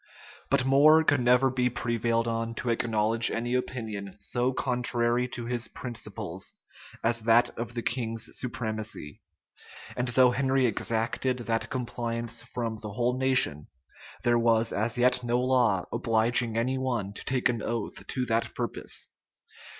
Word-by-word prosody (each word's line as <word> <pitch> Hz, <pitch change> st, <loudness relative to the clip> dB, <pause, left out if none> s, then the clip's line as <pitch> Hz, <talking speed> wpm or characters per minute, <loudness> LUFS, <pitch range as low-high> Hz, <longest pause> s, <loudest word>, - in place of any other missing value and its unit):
But 125 Hz, -, +3 dB
More 150 Hz, +4 st, +6 dB
could 145 Hz, -3 st, +3 dB
never 125 Hz, +2 st, +4 dB
be 125 Hz, -1 st, +1 dB
prevailed 115 Hz, -1 st, 0 dB
on 115 Hz, 0 st, -2 dB
to 120 Hz, -, -1 dB
acknowledge 115 Hz, 0 st, +2 dB
any 120 Hz, +1 st, -2 dB
opinion 110 Hz, -6 st, -3 dB
so 120 Hz, +5 st, 0 dB
contrary 125 Hz, -1 st, +1 dB
to 120 Hz, -1 st, -6 dB
his 120 Hz, -1 st, -2 dB
principles 120 Hz, -3 st, -6 dB, 0.5 s
as 115 Hz, +1 st, +2 dB
that 115 Hz, +2 st, +3 dB
of 120 Hz, +1 st, -5 dB
the 120 Hz, -, -3 dB
king's 115 Hz, -2 st, -2 dB
supremacy; 110 Hz, -, -4 dB, 0.7 s
and 125 Hz, -, -1 dB
though 125 Hz, +1 st, +5 dB
Henry 135 Hz, 0 st, +2 dB
exacted 115 Hz, +3 st, 0 dB
that 115 Hz, -2 st, -2 dB
compliance 115 Hz, -2 st, -3 dB
from 115 Hz, -3 st, -4 dB
the 105 Hz, -2 st, -7 dB
whole 125 Hz, +3 st, 0 dB
nation, 130 Hz, -, +1 dB, 0.6 s
there 120 Hz, 0 st, +3 dB
was 115 Hz, -1 st, +2 dB
as 110 Hz, +3 st, 0 dB
yet 125 Hz, +1 st, +3 dB
no 120 Hz, +1 st, +1 dB
law 125 Hz, -7 st, +2 dB
obliging 115 Hz, 0 st, +1 dB
any 130 Hz, +3 st, 0 dB
one 120 Hz, -7 st, -2 dB
to -, -, -7 dB
take 130 Hz, -2 st, +1 dB
an 120 Hz, -3 st, -1 dB
oath 115 Hz, -1 st, -4 dB
to 130 Hz, -1 st, -2 dB
that 115 Hz, -1 st, -1 dB
purpose. -, -, -2 dB
120 Hz, 145 wpm, -28 LUFS, 115-125 Hz, 0.7 s, More